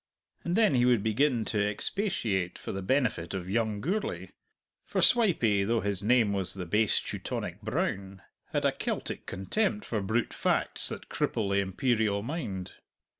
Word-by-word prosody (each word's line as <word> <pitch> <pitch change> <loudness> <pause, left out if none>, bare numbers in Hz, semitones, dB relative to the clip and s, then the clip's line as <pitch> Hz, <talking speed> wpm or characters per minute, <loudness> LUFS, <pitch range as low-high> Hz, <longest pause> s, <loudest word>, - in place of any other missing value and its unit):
And 170 +1 -1
then 220 -6 +4
he 125 -2 +3
would 120 -4 +3
begin 115 +1 +2
to 105 -2 0
expatiate 105 - -1
for - - -6
the 95 - -4
benefit 100 -6 0
of 90 -2 -4
young 105 0 0
Gourlay 195 - -2 0.5
for - - -2
Swipey, 155 - +4
though 115 +2 +1
his 100 -2 -1
name 110 -1 +3
was 95 -2 -1
the 95 -2 -5
base 105 +5 +2
Teutonic - - -5
Brown, 95 0 -3 0.3
had - - 0
a - - +4
Celtic - - -4
contempt 210 - -1
for 110 -3 -2
brute 110 +5 -1
facts - - +2
that - - -7
cripple 100 -3 -1
the 100 - +3
imperial 100 +1 0
mind. 115 - -4
110 Hz, 160 wpm, -29 LUFS, 100-125 Hz, 0.5 s, then